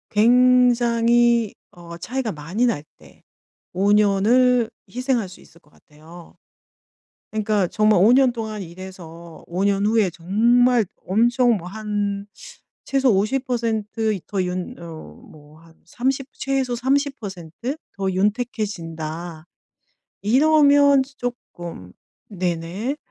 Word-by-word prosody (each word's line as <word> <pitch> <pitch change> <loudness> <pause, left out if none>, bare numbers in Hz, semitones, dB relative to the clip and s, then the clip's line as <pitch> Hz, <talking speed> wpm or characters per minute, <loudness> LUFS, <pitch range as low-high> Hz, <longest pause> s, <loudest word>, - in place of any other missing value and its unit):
굉장히 240 -1 +4 0.2
어 170 -1 -11
차이가 245 +4 -3
많이 165 +11 -2
날 150 -12 -1
때 - - -20 0.5
5 200 +2 +2
년을 220 +4 +3 0.2
희생할 250 -5 -1
수 185 - -14
있을 170 - -20
것 150 - -29
같아요. 160 +3 -16 1.0
그러니까 215 -3 0
정말 215 -1 +2
5 225 +4 +6
년 260 -1 +5
동안 220 -3 -5
일해서 170 -2 -11
5 180 +3 -2
년 200 0 +1
후에 215 -4 +2
정말 230 +7 +3 0.2
엄청 240 +4 +3
뭐 175 -1 -8
한 205 -1 -3 0.6
최소 270 -2 +2
50% 220 -2 -1
더 195 -2 -1
윤 180 0 -4
어 165 -2 -10 0.2
뭐 150 +1 -17
한 165 -1 -20
30 265 +7 -2
최소 265 -2 -2
30% 245 - -3 0.2
더 195 -1 -1
윤택해진다 175 -6 -3 0.8
이러면 285 +3 +5 0.2
쪼끔 175 - -7 0.4
네네. 185 - -3
215 Hz, 170 characters per minute, -22 LUFS, 180-245 Hz, 1.0 s, 5